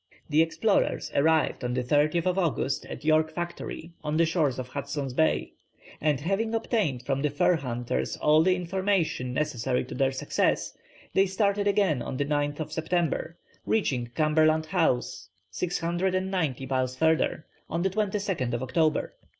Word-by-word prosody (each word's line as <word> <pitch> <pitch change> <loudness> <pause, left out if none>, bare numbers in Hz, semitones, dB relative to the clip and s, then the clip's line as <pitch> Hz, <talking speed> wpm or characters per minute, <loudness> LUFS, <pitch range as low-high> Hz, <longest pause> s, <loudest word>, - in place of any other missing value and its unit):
The 155 +2 +5
explorers 195 +6 +1
arrived 155 -1 +2
on 125 0 -1
the 125 - 0
30th 155 +7 +2
August 165 -7 -1
at - - -8
York 155 0 +3
Factory 175 0 -6
on 150 0 -1
the 165 - +4
shores 160 -6 +1
of 130 -1 -5
Hudson's 140 -1 -4
Bay, 160 +4 +1 0.5
and 150 -3 +2
having 200 +8 -1
obtained 210 - 0
from 135 -1 0
the 150 - +1
fur 145 +5 +3
hunters 120 - -3
all 155 +1 +4
the 185 +2 +3
information 180 -7 -1
necessary 130 -3 -1
to - - -8
their 135 +1 +1
success, 130 - 0 0.4
they 195 +1 +4
started 200 +1 +1
again 195 -10 +2
on 130 - -4
the 145 - 0
9th 145 +1 -1
September, 165 +1 -1 0.3
reaching 130 - 0
Cumberland 155 0 +3
House, 155 - 0 0.2
690 180 - -1
miles 130 -1 -1
further, 160 +1 +1 0.2
on 170 +2 -1
the 190 - +2
22nd 195 - -1
October. 155 +5 0
155 Hz, 145 wpm, -27 LUFS, 135-180 Hz, 0.5 s, The